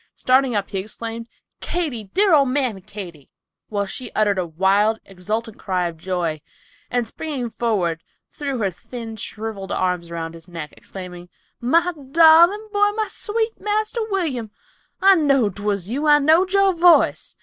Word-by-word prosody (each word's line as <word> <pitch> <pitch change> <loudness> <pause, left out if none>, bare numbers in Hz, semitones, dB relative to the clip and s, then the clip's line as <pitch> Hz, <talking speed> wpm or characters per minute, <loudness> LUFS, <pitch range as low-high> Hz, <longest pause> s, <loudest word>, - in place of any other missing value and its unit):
Starting 255 -1 +2
up 200 -1 -1
he 195 - -2
exclaimed, 230 +3 -6 0.3
"Katy, 290 -11 -3
dear 385 - +2
old 280 -4 +5
mammy 255 -7 0
Katy," 180 -7 -10 0.4
while 205 -1 -1
she 240 +5 -6
uttered 205 -3 +2
a 180 - -2
wild, 195 +6 +2
exultant 210 +4 -4
cry 185 -2 -1
of 165 -1 -8
joy, 170 -3 -2 0.5
and 245 -1 0
springing 255 -1 -5
forward 185 -10 -1 0.3
threw 280 -3 -4
her 200 -5 0
thin, 225 +5 -8
shriveled 215 -2 -6
arms 180 -2 -1
around 165 -1 -5
his 165 +1 -13
neck, 165 -4 -8
exclaiming, 180 -2 -10 0.3
"My 335 +9 +2 0.2
darling 340 +6 +6
boy, 410 0 +3
my 435 0 -2
sweet 445 +1 -2
Marster 430 +2 -1
William. 300 - -2 0.5
I 390 0 +8
knowed 275 - +2
'twas 200 -3 -2
you. 280 +8 -2
I 295 0 +7
knowed 320 +6 +3
your 395 -1 +4
voice. 345 0 +4
225 Hz, 155 wpm, -21 LUFS, 190-315 Hz, 0.5 s, I